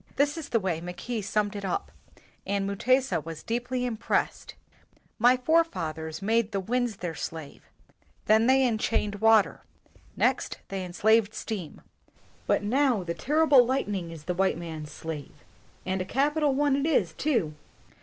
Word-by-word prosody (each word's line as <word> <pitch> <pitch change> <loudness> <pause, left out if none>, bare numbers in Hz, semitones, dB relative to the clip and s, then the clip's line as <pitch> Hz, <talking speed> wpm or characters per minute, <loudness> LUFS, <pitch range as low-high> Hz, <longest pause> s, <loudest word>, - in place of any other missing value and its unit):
This 290 +1 +2
is 320 -3 -7
the 230 - +2
way 180 -5 -2
Mackay 180 +7 -4
summed 205 +1 -1
it 200 - -5
up, 400 - -2 0.5
and 200 0 -1
Mutesa 250 - +1
was 165 -1 -8
deeply 245 +2 -2
impressed: 230 -3 -2 0.6
"My 245 +3 +5
forefathers 195 - 0
made 225 +1 +1
the 200 - -1
wind 245 +5 0
their 175 -4 -5
slave; 160 -1 -7 0.6
then 220 +2 +4
they 265 0 +5
enchained 215 -3 0
water; 225 -2 +4 0.6
next - - +1
they 195 -1 -3
enslaved 215 +4 +2
steam; 195 -9 -5 0.7
but - - +2
now 250 -1 +2
the 170 -1 -3
terrible 285 - +4
lightning 205 -9 -2
is 165 -2 -9
the 180 - -2
white 190 -1 +1
man's 160 -3 -7
slave, 155 -3 -7 0.5
and 185 0 -1
a - - -3
capital 290 +5 +1
one 285 -1 +2
it 280 +2 0
is, 320 - +2
too!" 230 - 0
215 Hz, 150 wpm, -27 LUFS, 180-255 Hz, 0.7 s, My